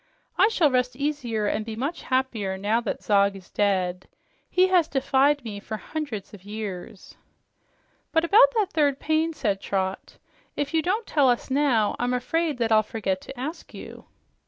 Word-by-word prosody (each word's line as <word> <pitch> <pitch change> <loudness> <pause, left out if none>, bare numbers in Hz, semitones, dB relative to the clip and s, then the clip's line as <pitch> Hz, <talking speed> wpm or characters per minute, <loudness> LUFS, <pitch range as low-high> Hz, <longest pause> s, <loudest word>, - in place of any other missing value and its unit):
I 405 - +5
shall 345 -10 +2
rest 250 -1 +1
easier 260 -7 -2
and 210 +1 -1
be 220 0 -6
much 280 +9 -3
happier 240 -7 -1
now 210 +4 +1
that 230 - -4
Zog 200 -1 +3
is 190 -2 -13
dead. 185 -3 0 0.4
He 365 0 +4
has 360 -4 +4
defied 275 +1 +2
me 210 -3 -6
for 215 +2 -6
hundreds 250 -9 -6
of 195 -3 -12
years." 205 -1 -7 1.0
"But 325 +1 +2
about 465 +8 +6
that 420 -4 +1
third 285 -4 +2
pain," 315 +1 +1
said 210 -11 -2
Trot. 190 -1 -3 0.4
"If 290 +2 -3
you 320 - +3
don't 400 +8 -1
tell 285 -4 +3
us 245 +2 -1
now, 260 -7 +2
I'm 245 +1 0
afraid 315 +3 -1
that 230 -2 0
I'll 215 -1 +6
forget 200 -3 -3
to 270 - -10
ask 305 +7 -6
you." - - -10
250 Hz, 175 wpm, -25 LUFS, 210-300 Hz, 1.0 s, about